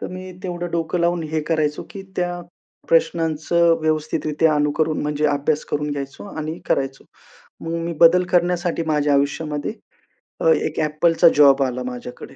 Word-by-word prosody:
तर - - -5
मी 185 0 -8
तेवढं 175 -2 -4
डोकं 170 +1 -1
लावून 170 0 +1
हे 155 - +1
करायचो 155 -2 0
की 195 - -8
त्या 175 0 -2 0.5
प्रश्नांचं 165 0 +2
व्यवस्थितरित्या 155 0 0
अनुकरन 150 +1 0
म्हणजे 150 0 0
अभ्यास 145 +1 0
करून 150 0 -1
घ्यायचो 140 -1 -6
आणि 155 +2 -4
करायचो. 135 0 -1 0.6
मग 165 0 -4
मी 170 - -3
बदल 175 +2 +6
करण्यासाठी 175 -1 +1
माझ्या 150 -2 +2
आयुष्यामध्ये 145 +3 -1 0.7
अ, - - +2
एक - - -2
Appleचा 165 +3 +3
जॉब 140 -2 +6
आला 125 -1 -2
माझ्याकडे. 125 +1 -8
155 Hz, 145 wpm, -21 LUFS, 145-170 Hz, 0.7 s, बदल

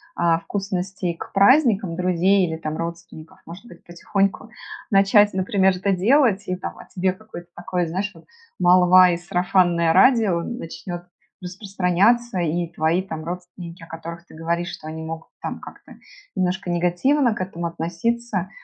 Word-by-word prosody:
а, 165 -1 +2
вкусностей 190 -2 -3
к - - -9
праздникам 205 - +4
друзей 185 +2 +2
или 160 - -3
там 155 -1 -5
родственников. 170 +1 -8
Может 180 +8 -11
быть, 175 -7 -15
потихоньку 195 +3 -2 0.4
начать, 200 +1 +5
например, 190 0 +2
это 195 +2 -1
делать. 210 +1 +3
И 185 - -1
там, 180 - -7
о - - -11
тебе 185 0 -1
какое-то 185 -4 -12
такое, 175 0 -2
знаешь 190 +5 -3
вот, - - -17 0.3
молва 180 0 +6
и 170 - -1
сарафанное 175 -1 +1
радио 200 -5 +4
начнет 175 -4 -7 0.4
распространяться, 195 +4 0
и 170 0 -1
твои 160 +4 +1
там 160 -4 -7
родственники, 175 -1 -8
о - - -12
которых 170 +1 -9
ты - - -16
говоришь, 170 +2 -2
что 155 - -9
они 160 0 -6
могут 160 0 -7
там - - -5
как-то - - -13 0.4
немножко 185 0 -1
негативно 215 +9 +1
к - - -5
этому 170 -2 -4
относиться, 190 +5 -3
180 Hz, 150 wpm, -22 LUFS, 170-195 Hz, 0.4 s, молва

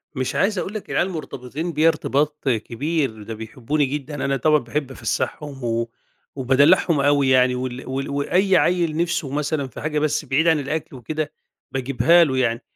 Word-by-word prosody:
مش 130 -1 -2
عايز 205 +1 +1
أقول 195 - -4
لك 215 - -6
العيال 185 - +1
مرتبطين 155 -1 -5
بيَّ 155 +2 +3
ارتباط 150 -2 0
كبير، 120 +1 -1
ده 115 - -6
بيحبّوني 115 +7 -2
جدًا، 145 +2 -4
أنا 135 0 +1
طبعًا 155 +1 +3
باحب 135 +2 -4
أفسّحهم 135 +4 -3
و 115 0 -1 0.5
وبادلّعهم 145 +5 +4
أوي 140 -1 +3
يعني 130 -1 +4
وال 125 0 -5
وال 135 +1 -3
وأي 180 +7 +2
عيّل 170 -3 +1
نِفسه 170 -4 -1
مثلًا 145 -1 -1
في 125 - -10
حاجة 150 -1 -1
بس 150 0 0
بِعيد 140 +5 +1
عن 160 -2 +4
الأكل 145 +1 -4
وكده 150 +4 -4 0.4
باجيبها 140 +6 +4
له 135 -5 0
يعني، 120 -2 +1
140 Hz, 170 wpm, -22 LUFS, 130-155 Hz, 0.5 s, وبادلّعهم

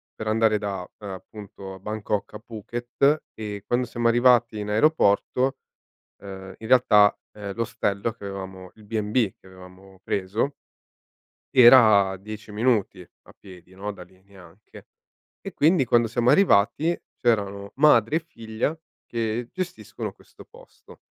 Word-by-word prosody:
per 110 - -6
andare 110 -1 +2
da 100 -3 -5
appunto 100 0 -9
a - - -13
Bangkok 105 0 -4
a - - -7
Phuket, 120 +6 -1
e 105 -2 -7
quando 125 +1 0
siamo 120 -1 -1
arrivati 120 -1 +3
in 105 0 -5
aeroporto, 130 +1 +2 0.6
ehm, 95 -1 -10
in 110 - -9
realtà, 105 -5 +5 0.2
ehm, 100 -2 -7
l'ostello 115 -2 -2
che 110 -2 -14
avevamo 95 -2 -8
il 110 - -17
B&B 105 0 -1
che - - -21
avevamo 95 +1 -16
preso 105 +11 -2 0.9
era 115 -6 +7
a 95 - -5
10 105 +2 -10
minuti 105 -4 0
a 85 - -21
piedi, 90 -2 -15
no, 100 +2 -5
da 95 - -12
lì, 95 +1 -24
neanche. 95 0 -17 0.5
E - - -8
quindi 160 -1 +3
quando 120 -1 +2
siamo 120 +2 +1
arrivati 155 - +3 0.2
c'erano 100 -4 -1
madre 140 -2 +4
e 165 - +1
figlia 115 -2 -4 0.3
che 115 0 -3
gestiscono 110 - -6
questo - - -18
posto. - - -18
110 Hz, 140 wpm, -24 LUFS, 100-120 Hz, 0.9 s, era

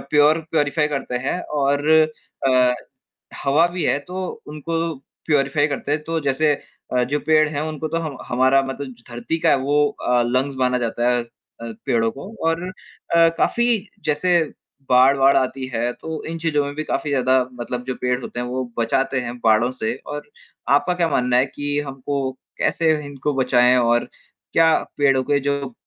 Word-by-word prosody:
Pure 150 +1 +3
purify 150 0 +1
करते 135 -4 -3
हैं 180 - -1
और 145 0 0 0.6
अ, 125 -1 +4 0.7
हवा 150 +5 +4
भी 175 -1 -4
है - - +2
तो 185 +1 -4 0.2
उनको 165 +2 -3 0.3
प्यूरीफ़ाई 145 0 +2
करते 145 0 -4
हैं। 150 +1 0
तो 165 +1 -2
जैसे 145 +2 +2 0.4
अ, 125 - +3
जो 145 +4 -1
पेड़ 155 0 +3
हैं 145 -1 -3
उनको 155 0 -3
तो 165 +2 -2
हम 155 -5 -5
हमारा 130 +2 +3
मतलब 135 0 -6 0.2
धरती 120 +7 -3
का - - +3
है - - +5
वो 145 +2 +2
अ, 125 -3 0
लंग्स 130 +3 0
माना 125 -1 +2
जाता 120 0 0
है 120 -1 +1
अ, - - -19 0.6
पेड़ों 115 -4 +1
को 140 - -9 0.2
और 165 +1 -1 0.5
अ, 165 0 +6
काफ़ी 235 -3 +1 0.2
जैसे 175 +4 +2 0.5
बाढ़-वाढ़ 135 +2 +5
आती 130 0 -1
है 120 +1 0
तो 160 -1 -5
इन 165 - -4
चीज़ों 150 -3 +2
में 145 - -5
भी 155 - -3
काफ़ी 150 - -2
ज़्यादा 130 -1 +3
मतलब 125 0 -5
जो 130 - -3
पेड़ 125 0 +1
होते 120 - -6
हैं, 125 - -3
वो 130 +1 -2 0.2
बचाते 130 +3 +1
हैं 120 0 -6
बाढ़ों 115 +2 +4
से 110 +2 0 0.2
और 150 0 -8 0.5
आपका 180 +5 -1
क्या 175 -1 +1
मानना 125 -3 +2
है 130 - +4
कि 145 0 -1
हमको 135 0 -3 0.3
कैसे 165 -1 +2
इनको 145 +1 -3
बचाएँ 125 0 +4
और 120 -1 +2 0.5
क्या 165 -1 +5 0.2
पेड़ों 135 -2 +3
के 145 +2 +1
जो 140 -2 -2
140 Hz, 175 wpm, -21 LUFS, 125-155 Hz, 0.7 s, अ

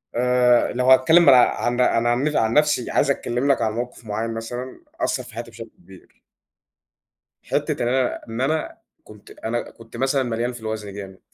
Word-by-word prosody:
آآ 125 0 +3
لو 125 +1 +2
هاتكلّم 160 +7 +6
ما 140 - +8
لا 130 - +7 0.2
عن 120 +1 0
عن 115 -1 +2
عن 120 +2 +1
نف 150 0 -1
عن 110 0 +1
نَفْسي، 150 -5 +2
عايز 140 - +2
أتكلّم 130 +1 -1
لك 135 - 0
عن 110 - 0
موقِف 120 0 -6
معيّن 110 +2 -3
مثلًا 120 +3 -7 0.2
أثّر - - -1
في - - -14
حياتي - - -7
بشكل - - -10
كبير - - -19 1.2
حِتّة - - -2
إن 120 - 0
أنا 130 0 0
إن 115 +2 -5
أنا 155 +4 -1 0.3
كنت 105 -1 -16
أنا 120 +1 -5
كنت 115 0 -13
مثلًا 135 +2 +1
مليان 120 0 -2
في 120 - -10
الوزن 110 -2 -5
جامد 95 -2 -9
120 Hz, 190 wpm, -22 LUFS, 115-130 Hz, 1.2 s, ما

